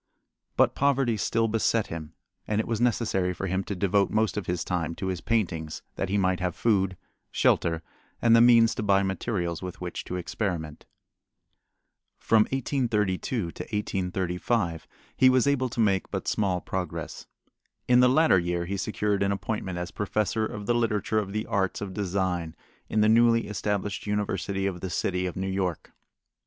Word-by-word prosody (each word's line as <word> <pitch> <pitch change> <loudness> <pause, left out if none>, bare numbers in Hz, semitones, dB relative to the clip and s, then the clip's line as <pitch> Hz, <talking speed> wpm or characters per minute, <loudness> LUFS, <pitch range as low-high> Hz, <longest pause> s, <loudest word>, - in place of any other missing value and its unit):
But - - +4
poverty 135 -4 +2
still 115 +3 +1
beset 115 0 +1
him 80 -2 -7 0.3
and 105 0 0
it 110 - -1
was 115 -1 -1
necessary 105 -7 +1
for 100 - -4
him 95 +1 -1
to 100 - -4
devote 100 +1 +2
most 110 0 +1
of 105 - -4
his 90 -1 -1
time 85 -2 -2
to 95 - -3
his 90 -2 -3
paintings, 85 -9 -1
that - - -2
he 100 - +1
might 95 -2 +1
have 90 -2 -2
food, 95 -5 +1 0.3
shelter, 80 -1 +1 0.4
and 115 -1 +5
the 115 - +7
means 115 -1 +6
to - - -4
buy 100 -2 +3
materials 95 -3 -2
with 90 -1 -7
which 90 -1 -5
to 90 - -5
experiment. 85 -4 -4 1.3
From 110 -1 +3
1832 115 - -1
to - - -8
1835 90 -2 -2 0.3
he 130 - +6
was 130 -1 +3
able 135 -3 +1
to 120 - -6
make 100 -4 +2
but - - -4
small 95 -4 0
progress. 90 -3 -5 0.6
In 125 0 +5
the 125 0 +6
latter 145 - +5
year 85 0 -1
he 100 +3 -3
secured 105 0 -1
an 100 0 +2
appointment 100 -2 -3
as 90 -1 -4
professor 105 +3 -1
of 105 -1 -7
the 120 - +2
literature 110 -2 +1
of 100 -2 -4
the 110 +1 -2
arts 95 -2 -1
of 100 -2 -5
design 90 -4 -2 0.3
in 110 - +1
the 105 - +5
newly 115 +1 +4
established 105 0 -3
University 100 -1 -1
of 95 -3 -3
the 95 - -3
City 90 +2 -1
of 90 - -5
New 95 - -2
York. 95 -3 -2
100 Hz, 175 wpm, -27 LUFS, 90-110 Hz, 1.3 s, the